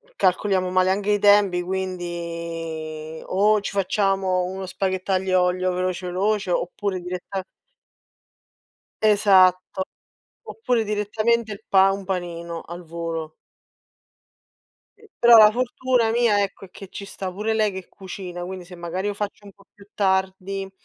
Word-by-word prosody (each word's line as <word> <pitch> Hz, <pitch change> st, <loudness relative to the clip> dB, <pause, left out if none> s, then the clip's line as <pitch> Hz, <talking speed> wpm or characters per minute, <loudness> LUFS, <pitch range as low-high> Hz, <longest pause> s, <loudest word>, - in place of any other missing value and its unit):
calcoliamo 185 Hz, -, +1 dB
male 185 Hz, 0 st, +3 dB
anche 200 Hz, +2 st, +1 dB
i 205 Hz, -, +2 dB
tempi, 205 Hz, -3 st, +5 dB
quindi 170 Hz, -3 st, -5 dB
o 210 Hz, +2 st, +2 dB
ci -, -, -4 dB
facciamo 195 Hz, -1 st, +1 dB
uno 190 Hz, +1 st, -5 dB
spaghetto 190 Hz, 0 st, -2 dB
aglio, 185 Hz, -1 st, +2 dB
olio, 185 Hz, +1 st, +1 dB
veloce 185 Hz, 0 st, -2 dB
veloce, 195 Hz, +2 st, 0 dB
oppure 185 Hz, +2 st, -2 dB
diretta 180 Hz, +2 st, -5 dB, 1.6 s
Esatto, 190 Hz, -3 st, +4 dB, 0.6 s
oppure 245 Hz, -, -1 dB
direttamente 215 Hz, +2 st, 0 dB
il 200 Hz, -, -10 dB
pa 195 Hz, 0 st, +5 dB
un 195 Hz, 0 st, -5 dB
panino, 170 Hz, -3 st, -4 dB
al 175 Hz, +1 st, -9 dB
volo. 165 Hz, -1 st, -5 dB, 1.6 s
Eh, 440 Hz, -, -20 dB
però 240 Hz, -1 st, +8 dB
la 215 Hz, -1 st, +9 dB
fortuna 250 Hz, 0 st, +1 dB
mia 230 Hz, -3 st, +3 dB
ecco, 195 Hz, 0 st, -5 dB
è 180 Hz, -, -25 dB
che 195 Hz, 0 st, -11 dB
ci 200 Hz, -, -8 dB
sta 195 Hz, -1 st, -6 dB
pure 210 Hz, +4 st, -2 dB
lei 215 Hz, -2 st, +1 dB
che 190 Hz, -1 st, -8 dB
cucina, 180 Hz, -2 st, -7 dB
quindi 185 Hz, 0 st, -7 dB
se 180 Hz, 0 st, -12 dB
magari 175 Hz, +3 st, -3 dB
lo 205 Hz, -, -2 dB
faccio 205 Hz, 0 st, -5 dB
un 200 Hz, -, -12 dB
po' 200 Hz, -, -23 dB
più 200 Hz, 0 st, -18 dB
tardi 190 Hz, 0 st, -1 dB
190 Hz, 140 wpm, -23 LUFS, 180-205 Hz, 1.6 s, la